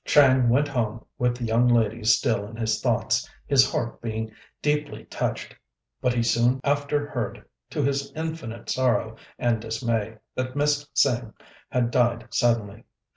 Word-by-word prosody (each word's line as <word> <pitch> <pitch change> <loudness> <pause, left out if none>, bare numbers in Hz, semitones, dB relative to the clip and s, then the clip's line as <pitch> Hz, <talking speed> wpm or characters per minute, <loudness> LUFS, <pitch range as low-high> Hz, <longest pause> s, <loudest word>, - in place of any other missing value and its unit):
Chang 130 -4 +5
went 140 +5 +3
home 115 -4 -2
with 125 0 +1
the 125 - -6
young 115 +2 +3
lady 115 -2 +2
still 110 -2 +3
in 115 - -10
his 110 -2 -1
thoughts, - - +1 0.2
his 135 -2 +4
heart 115 - -3
being 110 -1 -3 0.3
deeply 150 0 -1
touched; - - -3 0.5
but 125 - +2
he 120 - +2
soon 120 +2 +2
after 145 +1 +1
heard, 120 -6 -4 0.2
to 145 - -1
his 140 0 -1
infinite 160 -8 -5
sorrow 115 -4 +1 0.2
and 115 -2 +1
dismay, 115 -1 -2 0.2
that 130 0 -3
Miss 145 0 +1
Tsêng 120 -4 +2 0.3
had 120 -2 0
died 120 -1 +1
suddenly. 115 -3 +1
120 Hz, 150 wpm, -25 LUFS, 115-140 Hz, 0.5 s, Chang